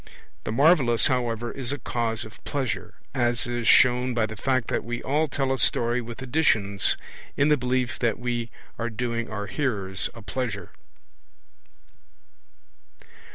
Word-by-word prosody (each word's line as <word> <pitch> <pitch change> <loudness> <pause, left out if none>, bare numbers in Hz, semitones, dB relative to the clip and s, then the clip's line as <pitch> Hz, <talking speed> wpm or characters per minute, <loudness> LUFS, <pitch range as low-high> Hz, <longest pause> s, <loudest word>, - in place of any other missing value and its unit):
The - - -2
marvellous, 130 -3 +4
however, 120 -3 0
is 135 -2 -4
a 145 - -2
cause 115 -3 -2
of 110 - -14
pleasure, 135 -5 -3 0.2
as 120 -3 +1
is 120 -1 -2
shown 125 0 +5
by 115 -2 +2
the 110 0 -7
fact 130 +2 0
that - - 0
we 120 0 -4
all 150 +4 +1
tell 135 -2 0
a 135 - -3
story 120 +1 +2
with 120 +2 -8
additions, 110 -8 +2 0.4
in 145 +1 +4
the 150 - +6
belief 125 -2 -1
that 115 -3 +1
we 120 -1 -2 0.3
are 115 +1 -1
doing 115 0 -3
our 105 -1 -4
hearers 100 -8 -1
a 115 - -10
pleasure. 105 -3 -4
120 Hz, 150 wpm, -26 LUFS, 115-130 Hz, 0.4 s, the